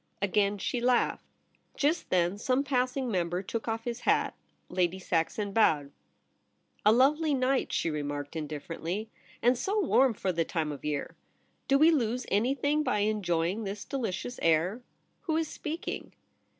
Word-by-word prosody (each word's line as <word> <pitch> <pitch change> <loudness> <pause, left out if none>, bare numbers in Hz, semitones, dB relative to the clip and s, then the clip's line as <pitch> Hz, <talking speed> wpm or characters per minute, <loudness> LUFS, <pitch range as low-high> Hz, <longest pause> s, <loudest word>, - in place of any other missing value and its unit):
Again 200 +1 +1
she 240 +5 -2
laughed. 245 0 +2 0.5
Just 305 +4 +1
then 180 +2 +1
some 255 +4 +1
passing 255 -1 0
member 175 -1 -1
took 225 +4 -4
off 225 0 -2
his 240 0 -4
hat. - - +2 0.3
Lady 180 0 0
Saxon 190 +3 -1
bowed. 150 -10 +3 0.5
' - - -40
A - - +8
lovely 290 +5 +4
night,' 260 0 +1
she 165 - 0
remarked 145 0 -4
indifferently, 165 +7 -4
* - - -25
and 245 +2 +5
so 400 - -1
warm 270 - +3
for 190 - -1
the 165 -1 +1
time 160 -2 -2
of 145 - -8
year! 150 -1 -3 0.5
Do 275 - +5
we 315 +4 +6
lose 250 -4 0
anything 275 +8 +2
by 210 -8 0
enjoying 195 -2 0
this 200 0 -5
delicious 245 -1 -3
air? 165 +8 +2 0.4
Who 315 -2 +1
is 325 -1 0
speaking 315 +3 -5
215 Hz, 155 wpm, -29 LUFS, 175-255 Hz, 0.5 s, A